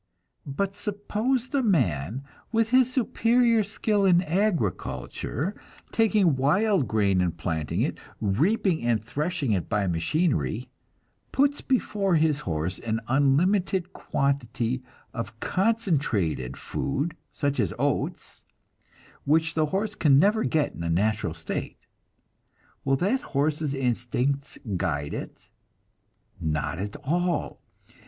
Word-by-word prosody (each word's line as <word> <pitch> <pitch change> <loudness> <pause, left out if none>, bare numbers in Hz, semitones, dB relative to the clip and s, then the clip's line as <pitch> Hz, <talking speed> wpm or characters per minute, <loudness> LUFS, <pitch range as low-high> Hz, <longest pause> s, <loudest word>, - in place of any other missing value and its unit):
But 195 +8 -2
suppose 215 +5 -1
the 280 -2 +1
man, 120 - +1 0.3
with 225 0 +1
his 255 -1 +5
superior 235 -2 +3
skill 205 0 0
in 180 -2 +5
agriculture, 170 - -1 0.4
taking 210 -8 +3
wild 185 - +2
grain 100 -3 +2
and 85 -2 -1
planting 80 -3 -2
it, - - -1 0.2
reaping 160 - +1
and 115 -2 +1
threshing 150 +1 -1
it 90 -6 -1
by 105 -2 +1
machinery, 105 - 0 0.6
puts 285 +1 +2
before 205 -7 +1
his 155 -2 +3
horse 85 - -2
an 115 0 -2
unlimited 175 +8 +2
quantity 130 -3 -1 0.3
of 115 -3 -3
a 115 0 -10
concentrated 140 - 0
food 145 +4 -2 0.2
such 140 -2 -1
as 100 -7 +1
oats, - - -2 0.8
which 160 +3 +2
the 155 -1 +1
horse 200 +6 -1
can 145 -9 +4
never 210 +7 +4
get 155 -3 +1
in - - -8
a 85 - -2
natural 100 -1 +1
state 80 -1 -5 1.1
will 135 0 +2
that 205 - +1
horse's 150 0 -1
instincts 130 +2 -1 0.2
guide 75 -4 -2
it? - - -7 0.9
Not 75 0 -2
at 100 +1 -4
all. 175 +3 -1
145 Hz, 120 wpm, -26 LUFS, -, 1.1 s, his